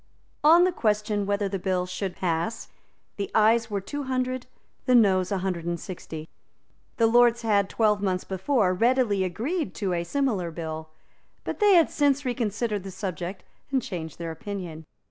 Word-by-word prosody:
On 330 +4 +7
the 365 - +3
question 210 - 0
whether 200 0 0
the 195 0 -3
bill 180 0 0
should 185 0 -4
pass, 170 +4 -2 0.5
the 200 -1 -3
Ayes 225 +1 +4
were 205 -1 -1
two 285 +9 -5
hundred, 255 -1 -2 0.4
the 250 - +5
Noes 190 -5 +4
a 200 - +1
hundred 180 -2 -2
and 170 0 -2
sixty. 160 -3 -7 0.7
The 230 - +4
Lords 240 +1 +4
had, 200 -3 +2
twelve 210 -2 +2
months 185 -2 0
before, 190 0 +1
readily 230 -1 +2
agreed 265 - -2
to 195 -4 -1
a 170 -1 -1
similar 215 -5 -1
bill; 160 -1 -6 0.5
but - - -4
they 415 -3 +6
had 335 -2 +5
since 285 -1 +2
reconsidered 225 -3 -1
the 195 - -8
subject 185 -1 -5 0.3
and 270 - +3
changed 175 - -6
their 170 -1 -4
opinion. 175 -3 -6
205 Hz, 165 wpm, -26 LUFS, 180-240 Hz, 0.7 s, On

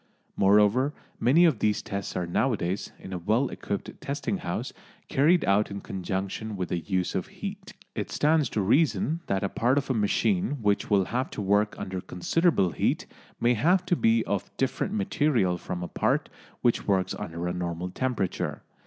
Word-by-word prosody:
Moreover, 105 +8 +4 0.2
many 160 +8 +5
of 150 -10 +3
these 105 -1 +1
tests 100 -1 -4
are 90 - -1
nowadays, 95 0 -1
in 95 - -9
a 90 - -3
well 110 +9 +1
equipped - - -5
testing - - -2
house, - - -4 0.4
carried 160 +6 +4
out 100 +2 +3
in 100 - -5
conjunction 95 +3 -4
with 90 -1 -3
the 90 - -1
use 90 +1 -1
of - - -2
heat. - - -7 0.2
It - - -4
stands 150 -3 +2
to 110 - -1
reason 150 - +2
that 95 0 0
a - - +2
part 125 +7 +1
of 140 -1 0
a - - +2
machine 145 - +1
which 100 -1 +1
will 100 -2 +4
have 125 +6 -2
to - - -1
work 105 +2 +2
under 95 -1 -4
considerable 100 - +1
heat - - 0 0.3
may 120 +1 +3
have 175 - +3
to 180 - +2
be 115 -6 +3
of 100 -2 -2
different 135 +10 -1
material 145 - +1
from 90 -1 -5
a - - -3
part - - 0 0.3
which 120 - +1
works 95 -2 +1
under 85 +1 -4
a 90 - -1
normal 90 0 -3
temperature. 120 -5 -2
105 Hz, 180 wpm, -27 LUFS, 95-135 Hz, 0.4 s, many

